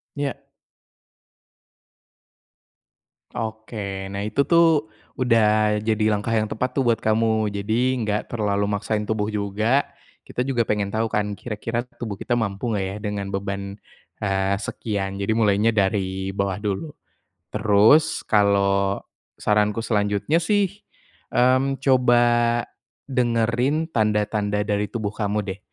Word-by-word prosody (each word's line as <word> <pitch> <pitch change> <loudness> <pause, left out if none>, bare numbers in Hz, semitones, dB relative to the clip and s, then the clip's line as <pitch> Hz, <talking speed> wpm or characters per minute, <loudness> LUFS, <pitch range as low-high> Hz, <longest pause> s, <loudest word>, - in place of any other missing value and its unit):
Iya. 140 -2 -3 2.9
Oke, 110 -3 -5
nah 100 - -3
itu 110 +7 0
tuh, 165 -4 +4 0.3
udah 110 -3 +3
jadi 110 0 +1
langkah 105 +2 -2
yang 110 -1 +2
tepat 125 +5 -3
tuh 135 - +2
buat 115 -1 +2
kamu. 110 -1 +1
Jadi 110 +6 0
enggak 105 -3 -2
terlalu 100 -3 0
maksain 105 +1 -1
tubuh 110 -1 -1
juga. 105 +6 +1 0.4
Kita 125 - -4
juga 130 -3 0
pengen 105 -2 -1
tahu 110 +1 0
kan, 105 -1 -1
kira-kira 115 +2 -4 0.2
tubuh 110 -5 -5
kita 120 - 0
mampu 105 +1 -2
enggak 100 -4 -1
ya 95 +1 -4
dengan 105 -1 -3
beban, 100 +1 -4 0.4
eee, 95 0 +1
sekian. 100 -3 -3
Jadi 100 +2 0
mulainya 110 0 +3
dari 95 -2 0
bawah 100 0 -1
dulu. 105 +9 -3 0.6
Terus 110 +8 +4
kalau 100 -1 +2 0.4
saranku 105 +1 +1
selanjutnya 105 +6 +1
sih, 200 +3 0 0.6
mmm, 130 +2 +2
coba 125 -3 +4 0.9
dengerin 125 +6 +1
tanda-tanda 105 -3 0
dari 105 0 0
tubuh 110 -3 -3
kamu 105 -1 -2
deh, 95 -1 -6
105 Hz, 120 wpm, -23 LUFS, 100-120 Hz, 2.9 s, tuh